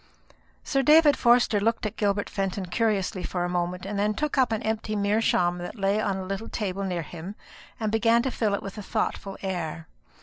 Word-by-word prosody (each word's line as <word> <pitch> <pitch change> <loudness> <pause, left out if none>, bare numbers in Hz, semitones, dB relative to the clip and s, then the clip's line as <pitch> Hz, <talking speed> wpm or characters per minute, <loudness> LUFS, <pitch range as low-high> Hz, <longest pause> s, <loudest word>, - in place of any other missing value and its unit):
Sir 275 -2 +1
David 300 +1 +6
Forster 240 -3 +4
looked 225 +2 0
at 215 - -3
Gilbert 205 -1 0
Fenton 195 -1 -2
curiously 195 -1 0
for 180 0 -2
a - - -2
moment, 180 +1 -2
and 200 0 -3
then 210 +1 +1
took 300 +5 -1
up 260 -4 +3
an 220 - -1
empty 220 -1 -2
meerschaum 200 -4 +2
that 175 +6 -7
lay 200 +1 +1
upon 200 -3 0
a 190 - -4
little 195 +4 -4
table 195 -2 -3
near 180 -3 -2
him, 175 +5 -8 0.4
and 215 -2 -1
began 230 +1 +3
to 265 - -1
fill 210 -4 0
it - - -6
with 195 +2 -7
a - - -4
thoughtful 200 -1 -3
air. 165 -4 -4
205 Hz, 205 wpm, -26 LUFS, 185-225 Hz, 0.4 s, David